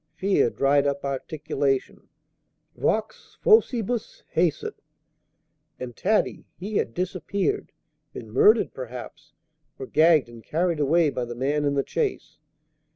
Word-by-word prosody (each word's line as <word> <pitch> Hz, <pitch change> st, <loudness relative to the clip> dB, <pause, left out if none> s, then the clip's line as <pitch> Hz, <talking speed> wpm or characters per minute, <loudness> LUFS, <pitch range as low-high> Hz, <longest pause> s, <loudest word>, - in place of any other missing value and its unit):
Fear 195 Hz, -10 st, +2 dB
dried 140 Hz, +2 st, +2 dB
up 140 Hz, 0 st, -2 dB
articulation. 140 Hz, 0 st, -2 dB, 0.7 s
Vox -, -, -2 dB
faucibus 245 Hz, -, +2 dB
hæsit. 165 Hz, -2 st, +1 dB, 1.1 s
And 125 Hz, -2 st, -7 dB
Taddy? 215 Hz, +3 st, 0 dB
He 200 Hz, +3 st, -3 dB
had 115 Hz, -, -1 dB
disappeared, 190 Hz, -, -2 dB, 0.4 s
been -, -, -9 dB
murdered, 425 Hz, 0 st, +4 dB
perhaps, -, -, -9 dB, 0.4 s
or 405 Hz, -, -6 dB
gagged 160 Hz, -, +4 dB
and 115 Hz, -1 st, -13 dB
carried 170 Hz, 0 st, 0 dB
away 155 Hz, +2 st, +3 dB
by 125 Hz, -, -3 dB
the 120 Hz, 0 st, -7 dB
man 145 Hz, +4 st, 0 dB
in 140 Hz, 0 st, +1 dB
the 140 Hz, -, 0 dB
chaise. 440 Hz, -4 st, -3 dB
155 Hz, 120 wpm, -25 LUFS, 140-200 Hz, 1.1 s, murdered